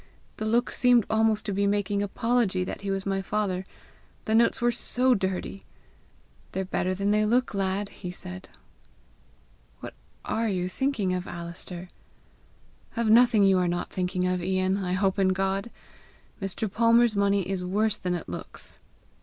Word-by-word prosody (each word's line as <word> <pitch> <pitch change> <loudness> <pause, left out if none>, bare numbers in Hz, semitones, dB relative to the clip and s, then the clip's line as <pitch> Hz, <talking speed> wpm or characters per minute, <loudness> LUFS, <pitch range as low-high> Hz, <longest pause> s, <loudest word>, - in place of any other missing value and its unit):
The 215 - -3
look 240 +3 +1
seemed 245 -4 +4
almost 220 -1 +2
to 205 - -2
be 200 +1 +1
making 205 0 0
apology 205 -2 0
that 180 - -6
he 200 - -4
was 195 0 -2
my 195 -1 0
father 190 -2 -2 0.6
the 220 - 0
notes 230 +1 +4
were 240 0 +2
SO 250 +2 +2
DIRTY! 190 -1 -3 0.9
'They're 190 0 -2
better 185 0 -1
than 200 +2 0
they 210 0 +3
look, 245 +3 +1
lad!' 195 +1 -1
he 185 -2 -8
said." 180 +1 -8 1.3
"What - - -8 0.3
ARE 225 0 0
you 180 -2 -1
thinking 210 -3 -1
of, 180 0 -3
Alister?" 170 +1 -7 1.1
"Of 230 -2 +2
nothing 230 -2 +6
you 190 -1 +5
are 180 - +1
not 175 0 -2
thinking 180 0 -1
of, 180 0 0
Ian, 185 +1 +1
I 180 0 -1
hope 190 +1 +1
in 190 -1 +3
God! 195 +3 -1 0.7
Mr. 195 +3 -2
Palmer's 230 +2 +3
money 200 -2 +2
is 190 -1 -2
worse 210 +4 0
than 180 -1 -1
it 175 - -6
looks." 85 - -5
195 Hz, 160 wpm, -27 LUFS, 185-220 Hz, 1.3 s, nothing